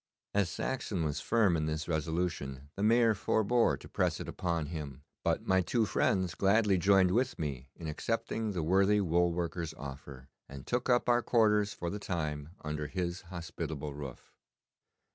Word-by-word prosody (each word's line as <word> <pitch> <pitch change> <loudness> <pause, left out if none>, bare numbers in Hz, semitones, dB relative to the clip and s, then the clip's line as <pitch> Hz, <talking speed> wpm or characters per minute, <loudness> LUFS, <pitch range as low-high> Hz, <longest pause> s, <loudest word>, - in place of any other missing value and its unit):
As 100 -4 +2
Saxon 100 - -2
was 75 -2 -2
firm 105 -7 +3
in 80 -1 0
this 80 0 -2
resolution 80 -4 -2
the 100 - -5
Mayor 115 +1 +5
forbore 110 +3 +2
to - - -12
press - - 0
it - - -6
upon 85 -3 -2
him, 75 -3 -6 0.2
but - - 0
my 95 0 +3
two 115 +5 +1
friends 95 -4 +1
gladly 100 +2 +3
joined 95 0 +5
with 125 +6 +1
me 70 -4 -4
in 80 - -7
accepting 115 +5 -2
the 85 -4 -1
worthy 95 +5 +4
wool 85 -2 +2
worker's 85 -2 -3
offer, 70 -2 -9 0.2
and 70 -1 -9
took 125 +1 -1
up 120 -1 +3
our 120 0 +4
quarters 105 -4 +3
for 85 - -3
the 105 - -4
time 75 -6 -3
under 75 -1 -3
his 90 +2 -3
hospitable 80 -4 -5
roof. 70 -3 -9
85 Hz, 165 wpm, -32 LUFS, 75-105 Hz, 0.2 s, Mayor